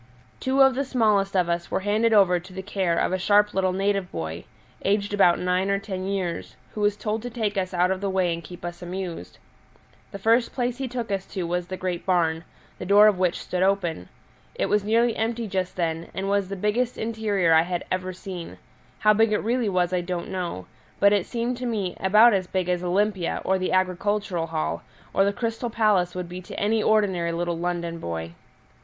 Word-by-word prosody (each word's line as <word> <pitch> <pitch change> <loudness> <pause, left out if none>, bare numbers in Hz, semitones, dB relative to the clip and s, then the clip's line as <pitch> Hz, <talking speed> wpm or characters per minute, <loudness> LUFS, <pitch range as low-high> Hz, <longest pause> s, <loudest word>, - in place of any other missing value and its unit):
Two 270 +1 +3
of 265 0 +5
the 275 +2 -1
smallest 215 -7 +1
of 180 -2 +3
us 170 0 -2
were - - -1
handed 215 +3 +2
over 190 -4 +5
to 180 +2 -14
the 190 0 -6
care 190 -4 -1
of - - +1
a 185 - 0
sharp 210 +2 +3
little 190 -1 +1
native 195 0 -1
boy, 80 +1 -5 0.4
aged 205 +1 0
about 180 -4 +5
nine 180 +2 0
or 200 - +2
ten 190 -2 -5
years, 175 - -3 0.2
who 210 - -4
was 205 0 +2
told 215 +1 -2
to 245 - -5
take 220 -3 -2
us 185 -2 -1
out 180 0 +2
of 190 0 -2
the 200 - -1
way 185 -2 +1
and 165 0 -6
keep 175 +2 -10
us 175 0 -6
amused. 180 -1 -6 0.7
The 200 - -6
first 230 +4 +2
place 245 -1 -1
he 265 - -2
took 240 -3 -4
us 195 -1 -2
to 185 - -4
was 175 +1 -2
the 185 0 -5
great 180 -2 -3
barn, 165 -3 +1 0.4
the - - -5
door 205 +2 +7
of 210 -4 +4
which 180 -2 +1
stood 180 - -3
open; 185 - 0 0.5
it - - 0
was 210 -1 +1
nearly 230 +2 +2
empty 230 +1 -1
just 185 -2 -2
then, 165 -2 -2
and 195 +1 -2
was 200 -1 0
the 195 - -3
biggest 215 +6 0
interior 210 -6 +1
I 160 - +7
had 175 +1 -3
ever 185 0 -1
seen; 180 -2 -8 0.4
how 215 +7 +4
big 225 +1 +3
it 210 - +3
really 235 0 0
was 180 -1 +1
I 180 - +1
don't 175 0 -4
know, 175 - -4 0.3
but 200 0 +5
it 200 -4 +1
seemed 240 +1 -2
to 250 0 -4
me 205 -6 -2
about 210 +5 +6
as 185 -2 0
big 185 -1 -2
as 180 0 0
Olympia 190 0 0
or 190 0 +2
the 185 - -1
Agricultural 185 -1 0
Hall, 160 -1 -2 0.3
or 195 - +4
the 200 - +2
Crystal 230 +2 -3
Palace 210 -6 +2
would 180 -1 -4
be 180 +1 -7
to - - -8
any 215 +2 +1
ordinary 190 -6 +2
little 170 0 -2
London 170 -1 -3
boy. 85 - -5
190 Hz, 215 wpm, -25 LUFS, 180-210 Hz, 0.7 s, door